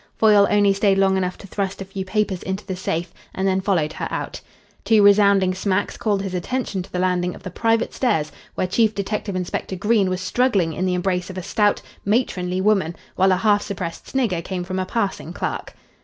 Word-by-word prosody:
Foyle 210 -2 +6
only 205 -1 +4
stayed 195 0 +2
long 195 0 +3
enough 185 -1 -1
to - - -12
thrust 195 0 -3
a 195 - -5
few 195 0 -5
papers 195 -1 -1
into 190 +2 -4
the 190 - -4
safe, 175 -1 -3 0.2
and 190 +1 0
then 190 0 +1
followed 170 -6 0
her - - -4
out. - - -4 0.4
Two 220 -2 +4
resounding 200 -2 +5
smacks 190 +1 -1
called 205 -3 0
his 195 -2 -4
attention 195 +2 -2
to 180 - -11
the - - -3
landing 180 -1 0
of - - -14
the 185 - -6
private 225 +4 +1
stairs, 160 - 0 0.2
where - - 0
Chief 215 +4 +2
Detective 200 0 -3
Inspector 185 +1 -3
Green 205 0 +2
was 185 0 -1
struggling 190 -4 +1
in 185 +4 -1
the 180 - +1
embrace 180 0 -1
of 185 - -7
a 185 - -4
stout, 210 +1 +1 0.2
matronly 185 -5 0
woman, 190 -5 +2 0.2
while 190 +1 +4
a 185 - +3
half 205 +1 +3
suppressed 180 -5 -5
snigger 225 -11 0
came 180 +1 -4
from 185 +1 -3
a 185 - -2
passing 195 -7 -2
clerk. - - -4
190 Hz, 210 wpm, -22 LUFS, 185-205 Hz, 0.4 s, Foyle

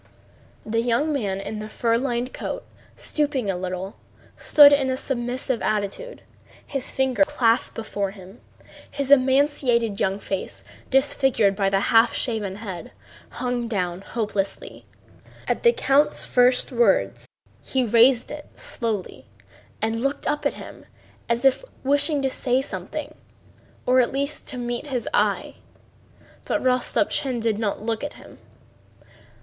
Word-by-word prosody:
The 225 +1 0
young 245 +6 +1
man 200 -8 -2
in 210 +2 -5
the 215 0 -7
fur 230 +1 0
lined 245 0 -2
coat, - - -5 0.3
stooping 285 -9 0
a - - -4
little, 185 +2 -5 0.4
stood 290 -1 +7
in 275 -2 +2
a 260 - -1
submissive 250 -1 -2
attitude, 215 - -3 0.4
his 275 -3 -2
fingers 265 +2 +2
clasped 240 -5 +2
before 205 -3 -3
him. 195 +2 -13 0.5
His 280 -1 -3
emaciated 260 -5 +3
young 190 +1 0
face, 195 -2 -5 0.3
disfigured 265 -6 +3
by 195 -1 +1
the 195 0 +2
half 225 +1 +5
shaven 215 -5 -2
head, 190 - -8 0.4
hung 245 0 -3
down 180 -5 -2
hopelessly. 205 -2 -4 0.6
At - - 0
the 470 - +6
count's 295 - +1
first 250 +2 +3
words 245 - +1 0.4
he 260 -2 0
raised 235 +2 +4
it 295 0 -8
slowly 230 - -4 0.6
and 225 +1 -1
looked 275 +2 -2
up 295 - 0
at - - -5
him - - -11 0.4
as 235 +3 0
if 270 - +4 0.2
wishing 285 +1 +2
to 270 - +2
say 255 0 0
something 270 - -6 0.7
or 255 +1 +4
at 240 - 0
least 280 +2 -2
to 260 - -5
meet 240 +3 -4
his 255 -4 -3
eye. - - 0 0.9
But - - -1
Rostopchín 255 0 +1
did 220 -2 0
not 210 -2 -2
look 225 +2 -2
at 290 - -5
him. - - -15
240 Hz, 140 wpm, -23 LUFS, 215-270 Hz, 0.9 s, stood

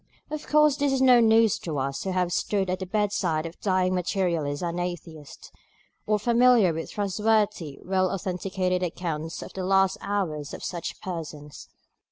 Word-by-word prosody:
Of 305 0 -5
course 300 -1 +4
this 285 -1 +1
is 270 - +1
no 255 -2 +6
news 225 -2 +4
to 155 -4 -4
us 135 0 -2
who 190 - -1
have 180 -1 0
stood 195 -2 0
at 185 - -2
the 190 - -5
bedside 190 -6 0
of 165 +1 -8
dying 185 -2 +1
Materialists 170 -5 -1
and 170 0 -2
Atheists, 165 -4 -7 0.6
or 215 - +3
are - - +2
familiar 235 -3 +4
with 165 +1 -5
trustworthy 210 -6 0
well 185 0 +1
authenticated 185 0 -2
accounts 165 -2 -4
of - - -11
the 190 - -4
last 195 0 +2
hours 175 -8 -3
of - - -10
such 170 -2 -5
persons. 155 -5 -7
185 Hz, 170 wpm, -26 LUFS, 170-210 Hz, 0.6 s, no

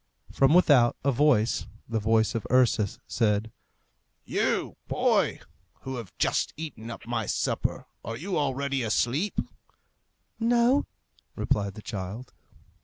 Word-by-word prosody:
From 135 +4 +4
without, 140 -9 +5
a 140 - +3
voice, 125 -4 +2 0.2
the 115 -1 -1
voice 110 +1 +2
of 115 - -3
Ursus, 120 -5 +3
said, 110 -1 0 0.7
"You, - - 0
boy, - - +1 0.4
who 130 -1 -5
have 115 -6 -7
just - - +1
eaten 140 -8 -7
up 115 - -8
my 115 -3 -2
supper, - - -1 0.2
are 115 - -5
you 185 +7 -3
already 140 -1 0
asleep?" 120 - 0 1.0
"No," 240 +4 +3 0.5
replied 100 -2 -1
the 110 - -10
child. 105 +4 -6
120 Hz, 120 wpm, -27 LUFS, 110-140 Hz, 1.0 s, without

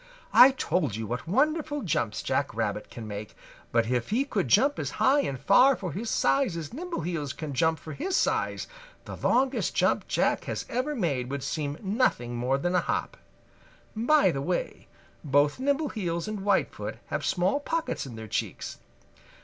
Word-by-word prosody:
I 255 - +10
told 175 - -1
you 110 0 -4
what 120 +7 -4
wonderful 295 - +1
jumps 115 - -1
Jack - - -1
Rabbit - - -2
can 115 -2 -8
make, 105 0 -7 0.4
but 115 -1 +3
if 120 -1 -1
he 250 +6 +1
could 200 - -1
jump 275 - +4
as - - -2
high 275 +2 +4
and 135 - -2
far 250 - +5
for 185 -7 -5
his 220 +8 -4
size 265 -10 +2
as 155 -3 -6
Nimbleheels 175 - -3
can 155 -3 -6
jump 160 +4 +2
for 155 - -9
his 370 +6 -1
size, - - 0 0.4
the - - -7
longest 260 +2 +1
jump - - +2
Jack - - +1
has - - -4
ever 260 +5 -1
made 140 - -1
would 140 -1 -4
seem 145 -2 -3
nothing 190 - 0
more 125 +3 +1
than 175 +6 -1
a 180 - +3
hop. - - -2 0.8
By 235 - +4
the 135 - -3
way, 175 +5 -3 0.4
both 145 - +2
Nimbleheels 250 - -1
and 215 -1 -4
Whitefoot 195 0 -1
have - - -2
small 185 +9 +1
pockets 305 - -2
in 120 - -8
their 110 0 -8
cheeks. - - -4
180 Hz, 175 wpm, -27 LUFS, -, 0.8 s, I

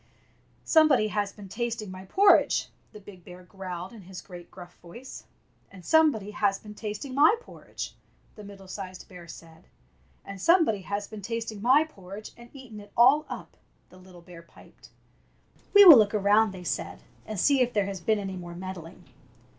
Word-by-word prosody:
''SOMEBODY 290 -9 +4
HAS 205 -1 -2
BEEN 205 -2 -12
TASTING 225 -1 -4
MY 185 0 -10
PORRIDGE!" 395 - +3 0.2
the 210 - -12
big 190 -3 -15
bear 180 +1 -13
growled 185 0 -8
in 225 - -12
his 185 0 -10
great 175 -2 -12
gruff 175 -1 -13
voice. 235 +10 -12 0.4
"And 185 -3 -15
somebody 295 -11 +2
has 200 -1 0
been 210 -1 -12
tasting 215 +5 -7
my 300 - +5
porridge!" 485 - -9 0.4
the 210 - -12
middle 200 -1 -13
sized 185 -1 -9
bear 180 -2 -13
said. 165 0 -14 0.6
And 195 -1 -9
somebody 325 - +3
has 205 +2 -4
been 215 -2 -10
tasting 225 0 -5
my 260 +7 +4
por 195 -12 -14
ridge 215 +1 -10
and 235 0 -15
eaten 255 -6 -12
it 205 - -15
all 265 +6 +5 0.6
the 185 - -18
little 180 -2 -16
bear 170 -1 -13
piped. 170 - -19 0.4
" - - -35
We 405 0 +10
will 315 -9 +11
look 210 0 +2
around," 210 +2 +3
they 185 -2 -10
said, - - -5 0.2
"and 215 -3 -5
see 275 +6 +3
if 245 -1 +1
there 205 -3 0
has 195 -2 -6
been 215 +4 +1
any 195 -2 -5
more 175 -1 -9
meddling." 180 -2 -9
205 Hz, 180 wpm, -26 LUFS, 185-235 Hz, 0.6 s, will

